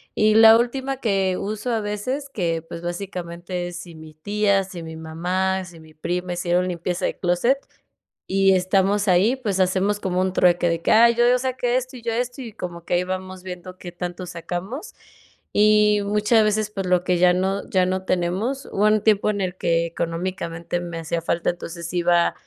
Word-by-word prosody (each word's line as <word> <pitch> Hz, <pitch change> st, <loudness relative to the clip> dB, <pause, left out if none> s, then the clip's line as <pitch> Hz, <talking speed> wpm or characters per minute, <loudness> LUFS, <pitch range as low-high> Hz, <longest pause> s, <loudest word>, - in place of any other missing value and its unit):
Y 215 Hz, 0 st, +3 dB
la 225 Hz, 0 st, +9 dB
última 265 Hz, +3 st, -1 dB
que 195 Hz, -6 st, 0 dB
uso 215 Hz, +4 st, -3 dB
a 225 Hz, -, 0 dB
veces 235 Hz, +8 st, -3 dB
que, 170 Hz, -9 st, -1 dB
pues 165 Hz, 0 st, -8 dB
básicamente 175 Hz, 0 st, -5 dB
es, 175 Hz, -, -8 dB
si 175 Hz, -2 st, -10 dB
mi 155 Hz, 0 st, -12 dB
tía, 200 Hz, +4 st, +1 dB
si 185 Hz, -2 st, -9 dB
mi 160 Hz, 0 st, -8 dB
mamá, 180 Hz, +4 st, -1 dB
si 175 Hz, -2 st, -13 dB
mi 155 Hz, 0 st, -17 dB
prima 180 Hz, +3 st, -3 dB
hicieron 175 Hz, +1 st, 0 dB
limpieza 175 Hz, 0 st, -3 dB
de -, -, -2 dB
clóset, 180 Hz, +9 st, +2 dB, 0.7 s
y 195 Hz, 0 st, +4 dB
estamos 195 Hz, +2 st, +1 dB
ahí, 190 Hz, +7 st, +4 dB
pues 210 Hz, -8 st, -2 dB
hacemos 190 Hz, +2 st, +1 dB
como 185 Hz, -2 st, -1 dB
un 185 Hz, 0 st, 0 dB
trueque 175 Hz, -1 st, +3 dB
de 165 Hz, 0 st, -1 dB
que: -, -, +1 dB
"Ay, 235 Hz, +2 st, +7 dB
yo 240 Hz, +1 st, +4 dB
yo 250 Hz, +1 st, +5 dB
saqué 250 Hz, -1 st, 0 dB
esto 255 Hz, 0 st, -4 dB
y -, -, -12 dB
yo 230 Hz, -1 st, -1 dB
esto", 245 Hz, +3 st, -3 dB
y 235 Hz, -3 st, -7 dB
como 175 Hz, -5 st, -7 dB
que -, -, 0 dB
ahí 175 Hz, -, +2 dB
vamos 185 Hz, 0 st, -5 dB
viendo 185 Hz, 0 st, -8 dB
qué 180 Hz, -1 st, -9 dB
tanto 175 Hz, +1 st, -5 dB
sacamos. 180 Hz, -, -6 dB, 0.6 s
Y 210 Hz, 0 st, +4 dB
muchas 210 Hz, +2 st, +3 dB
veces, 215 Hz, 0 st, 0 dB
pues 195 Hz, -3 st, -4 dB
lo 180 Hz, -1 st, +2 dB
que 180 Hz, -1 st, +1 dB
ya 180 Hz, 0 st, +5 dB
no 190 Hz, +2 st, 0 dB
ya 185 Hz, -1 st, +3 dB
no 185 Hz, +1 st, -1 dB
tenemos, 190 Hz, +10 st, -1 dB
hubo 205 Hz, -, +1 dB
un 215 Hz, 0 st, +4 dB
tiempo 215 Hz, -1 st, +3 dB
en 205 Hz, -1 st, -1 dB
el 185 Hz, -1 st, -2 dB
que 170 Hz, -1 st, +1 dB
económicamente 170 Hz, 0 st, -3 dB
me 170 Hz, -1 st, -6 dB
hacía 165 Hz, +1 st, -3 dB
falta, 170 Hz, +1 st, 0 dB
entonces 170 Hz, -1 st, -7 dB
iba, 175 Hz, -1 st, +3 dB
185 Hz, 200 wpm, -22 LUFS, 175-210 Hz, 0.7 s, la